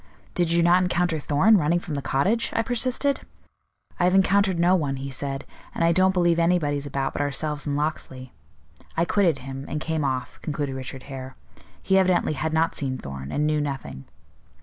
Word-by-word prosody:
'Did 175 -2 +1
you 170 0 +3
not 175 +2 +5
encounter 175 -2 0
Thorn, 155 +10 +4
running 165 +2 +2
from 175 -2 -5
the 140 - -2
cottage?' 195 +14 +1
I 225 - +2
persisted. 255 +4 0 0.8
'I - - +2
have 180 +1 +3
encountered 195 -1 +3
no 175 +2 +4
one,' 145 -6 -1
he 135 +1 -6
said, 135 +1 -4 0.3
'and - - 0
I 165 - +4
don't 185 +2 +4
believe 175 -2 +2
anybody's 150 -5 +1
about 135 -1 -2
but - - -2
ourselves 145 +1 -2
and 145 0 0
Locksley.' 130 -4 -4 0.6
I 165 - +3
quitted 175 -6 +2
him, 135 0 -6
and 150 - -2
came 160 -1 -2
off," 130 -2 -3
concluded 145 -2 -3
Richard 130 0 -6
Hare. 130 -1 -8 0.5
"He 190 0 +4
evidently 185 -4 +2
had 155 +2 -2
not 160 +1 +1
seen 130 -2 -2
Thorn, 70 - -7
and 150 - 0
knew 150 0 +1
nothing." 135 - -5
155 Hz, 190 wpm, -24 LUFS, 140-180 Hz, 0.8 s, not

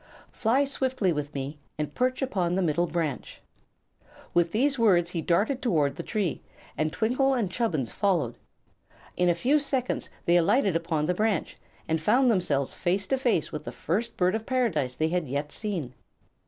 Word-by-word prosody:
Fly 250 +4 +2
swiftly 260 -9 0
with 145 -1 -3
me, 140 +2 -4 0.2
and 150 -1 -3
perch 255 +2 0
upon 180 -9 0
the 190 - +1
middle 170 +1 +1
branch." 160 -6 -3 0.9
With 175 -1 +2
these 270 +4 +1
words 175 -6 +4
he 170 - -2
darted 205 - +1
toward 150 - +1
the - - -5
tree, 200 -8 -2 0.3
and 155 +2 0
Twinkle 255 - +1
and 215 -7 -1
Chubbins 170 - -1
followed. 165 - 0 0.8
In 180 0 +2
a 175 - +3
few 270 - +2
seconds 265 -3 -1 0.2
they 175 +1 +5
alighted 190 +2 +3
upon 165 -2 0
the 180 - +1
branch 210 -1 -1 0.3
and 160 0 0
found 250 +9 +4
themselves 145 -9 +1
face 190 +3 0
to 265 - 0
face 235 - +1
with 150 -1 -5
the - - -6
first 225 +8 -2
Bird 180 0 +2
of 220 0 -3
Paradise 185 - 0
they 160 0 0
had 175 -2 -1
yet 145 +3 -3
seen. 175 - -4
180 Hz, 175 wpm, -27 LUFS, 155-235 Hz, 0.9 s, they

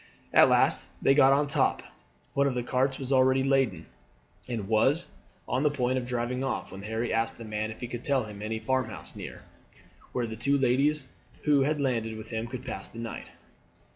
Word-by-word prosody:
At - - +7
last - - +3
they 135 - +4
got 135 -1 +6
to 145 - +3
the 140 - -8
top. - - +2 0.5
One 140 0 +3
of 130 - -1
the 125 - -1
carts 130 +2 0
was 135 -1 -5
already 130 0 +4
laden, 135 - +1 0.6
and 115 -6 -3
was 130 - +2 0.4
on 130 +1 0
the 150 - +4
point 130 -2 0
of 120 - -6
driving 125 +1 -2
off 135 - -3
when 95 - -8
Harry 110 +3 -2
asked 115 0 0
the 115 - -8
man 110 0 -2
if 110 - -9
he 120 - -3
could 120 +1 -6
tell 135 -3 +2
him 105 -1 -9
of - - -10
any 110 +1 -2
farmhouse 130 +3 -2
near, - - -8 0.7
where 125 - -1
the 110 -1 -5
two 140 +5 +1
ladies 135 +2 +2 0.4
who 145 -2 +4
had 150 +2 +1
landed 115 -5 -1
with 110 +1 -9
him 110 0 -2
could 125 0 -7
pass 95 - -5
the - - -14
night. 115 0 -6
125 Hz, 210 wpm, -28 LUFS, 115-135 Hz, 0.7 s, At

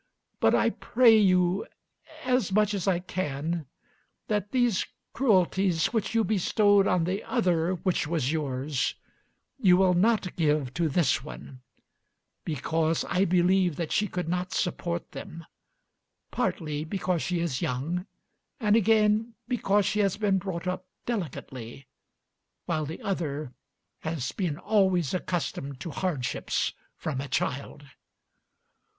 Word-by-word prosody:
But - - +4
I - - +3
pray 235 -2 +4
you 185 -2 +3 0.6
as 250 -6 +1
much 210 +1 +3
as 195 -3 -2
I 185 -3 +3
can 165 -3 -3 0.6
that 205 -1 -1
these 245 -6 +2 0.3
cruelties 190 -7 +2
which 225 0 -1
you 225 - +4
bestowed 205 -1 +3
on 180 -2 +2
the 185 +5 -2
other 180 -6 +1
which 180 -3 -1
was 150 -4 0
yours 140 -3 -1 0.6
you 185 -7 +5
will 185 -1 +4
not 195 0 +2
give 150 -5 +1
to 165 -2 0
this 140 -4 +2
one, 135 -3 -10 0.8
because 160 +1 0
I 190 +2 +2
believe 180 -1 +3
that 165 -1 -4
she 210 - +2
could 180 -2 -4
not 180 +1 -2
support 175 -1 -2
them; 165 0 -8 0.9
partly 150 -3 -1
because 180 0 -1
she 175 0 -1
is 165 -7 -1
young, 160 +9 -2 0.5
and 210 -3 +3
again 220 +1 +3
because 210 -5 +2
she 210 - 0
has 200 -2 +2
been 200 -3 +2
brought 180 -2 -5
up 180 0 -3 0.2
delicately, 135 - -5 0.8
while 155 -1 -1
the 160 - -7
other 150 -8 -3 0.5
has 160 -5 -3
been 175 -7 -2
always 190 -6 +2
accustomed 155 -7 -3
to 170 - -5
hardships 150 -8 -1 0.2
from 140 -4 -3
a 140 - -5
child." 140 +2 -3
180 Hz, 130 wpm, -27 LUFS, 155-200 Hz, 0.9 s, you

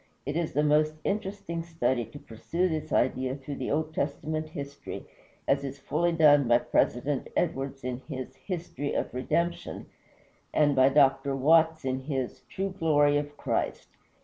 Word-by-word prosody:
It 145 +2 -3
is 165 -1 -1
a 150 - +4
most 155 +1 +3
interesting 195 -4 -2
study 130 -8 0
to 115 +7 -11
pursue 165 +9 -2
this 160 -3 -3
idea 130 +1 +1
through 140 0 -7
the 130 - -3
Old 155 +2 -1
Testament 155 +1 -2
history, 140 -2 -7 0.4
as 140 0 +2
is 140 0 -5
fully 170 +5 0
done 145 -5 +5
by 120 0 +6
President 130 +3 0
Edwards 135 -4 -1
in 125 0 -3
his 130 -2 -6
"History 165 -6 -4
of - - -2
Redemption" 170 +7 -1 0.7
and 145 -2 +4
by 130 0 +6
Dr. 135 -1 +3
Watts 160 +2 +4
in 130 0 0
his 135 -2 -3
"True 195 +1 -2
Glory 145 -4 +3
of 145 0 -4
Christ." - - -2
145 Hz, 155 wpm, -28 LUFS, 135-160 Hz, 0.7 s, by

